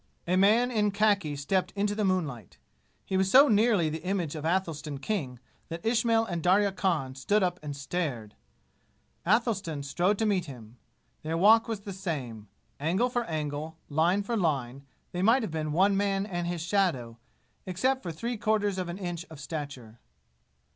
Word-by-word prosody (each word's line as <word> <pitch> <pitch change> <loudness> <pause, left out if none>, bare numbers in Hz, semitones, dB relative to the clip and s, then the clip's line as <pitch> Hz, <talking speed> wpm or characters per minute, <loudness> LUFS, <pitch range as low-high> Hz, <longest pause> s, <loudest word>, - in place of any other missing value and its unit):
A 180 - +2
man 220 +6 +4
in 210 -3 +2
khaki 200 -7 +1
stepped 180 +6 0
into 205 +1 0
the 210 0 -1
moonlight. 155 - -2 0.5
He 190 - -1
was 190 0 +2
so 275 +7 +8
nearly 210 - +3
the 155 +1 -4
image 180 -5 -2
of 155 -1 -6
Athelstan 165 -4 -1
King 135 -7 -3 0.3
that 165 +3 -7
Ismail 230 0 +2
and 175 -5 -3
Darya 195 +4 +3
Khan 170 -9 -1
stood 195 +11 +1
up 180 0 -1
and 145 -2 -5
stared. 140 -8 -3 0.9
Athelstan 195 - +1
strode 180 +8 +1
to 220 - 0
meet 195 -5 +1
him. 120 -5 -11 0.4
Their 160 +1 -2
walk 220 +5 +6
was 220 -3 -3
the 200 -1 -7
same. 135 - -5 0.3
Angle 185 - +1
for 245 -1 -1
angle, 155 -1 -4
line 170 +7 +2
for 235 +4 -2
line, 140 - -1 0.2
they 180 - -3
might 230 +6 +4
have 215 - -4
been 155 -1 -2
one 195 +5 +3
man 195 0 0
and 175 -4 -3
his 175 -1 -3
shadow, 165 - 0 0.5
except 260 +9 0
for 175 - -5
three 230 +9 -4
quarters 210 -3 0
of 180 -1 -3
an 170 - -5
inch 175 -3 -4
of 160 -3 -11
stature. 135 -7 -7
180 Hz, 175 wpm, -28 LUFS, 150-205 Hz, 0.9 s, so